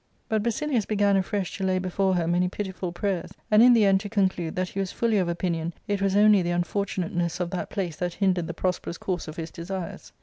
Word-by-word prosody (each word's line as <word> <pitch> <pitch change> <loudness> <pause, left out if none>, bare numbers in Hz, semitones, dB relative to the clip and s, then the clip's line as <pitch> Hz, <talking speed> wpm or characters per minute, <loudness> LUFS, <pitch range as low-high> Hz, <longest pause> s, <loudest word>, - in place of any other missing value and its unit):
But 220 -1 +1
Basilius 235 +1 0
began 205 -2 +3
afresh 195 0 -1
to - - -2
lay 185 -1 +2
before 185 +1 0
her 170 -2 0
many 180 +1 +2
pitiful 190 -2 -4
prayers, 180 0 -3 0.2
and 215 +1 +7
in 245 +1 +8
the 225 -3 +5
end 195 -1 +4
to 205 +1 -6
conclude 190 -5 0
that 185 0 -1
he 195 - -5
was 195 -1 -1
fully 225 -3 +1
of 180 -2 0
opinion 170 -1 -2
it 205 -1 -1
was 195 -1 +1
only 210 -1 +6
the 175 - -1
unfortunateness 175 -1 -1
of 175 -1 -2
that 185 - -3
place 175 -6 -3
that 175 -1 -3
hindered 185 -4 +1
the 170 - -5
prosperous 180 -2 -2
course 180 -4 -3
of 155 - -7
his 165 0 -5
desires. 180 +1 -6
185 Hz, 230 wpm, -26 LUFS, 175-200 Hz, 0.2 s, in